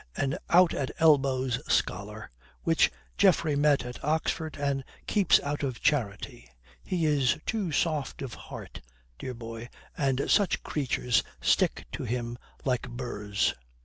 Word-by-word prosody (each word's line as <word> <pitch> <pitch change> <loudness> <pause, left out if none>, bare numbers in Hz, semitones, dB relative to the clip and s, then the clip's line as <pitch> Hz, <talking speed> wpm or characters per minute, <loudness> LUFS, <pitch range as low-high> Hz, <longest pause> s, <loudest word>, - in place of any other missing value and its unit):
An 135 -1 -1
out 180 0 +6
at 135 - -2
elbows 135 -5 +3
scholar - - -1 0.3
which 165 -1 +4 0.3
Geoffrey 170 -6 +4
met 145 -2 +3
at 125 0 -8
Oxford 160 +1 -1
and 140 -1 -1 0.2
keeps 200 -5 +4
out 145 +1 -3
of 130 -4 -2
charity. 105 - -1 0.3
He 175 -3 -1
is 140 -5 +3
too 205 -7 -1
soft 150 -3 -1
of 130 - -6
heart, - - -9 0.4
dear 130 -1 -5
boy, 115 0 -8 0.3
and 135 -1 0
such 200 -4 +2
creatures 125 -6 +1 0.2
stick - - +2
to - - -5
him 120 0 -3 0.3
like 125 -1 0
burrs." 105 -5 -1
135 Hz, 135 wpm, -28 LUFS, 125-155 Hz, 0.4 s, out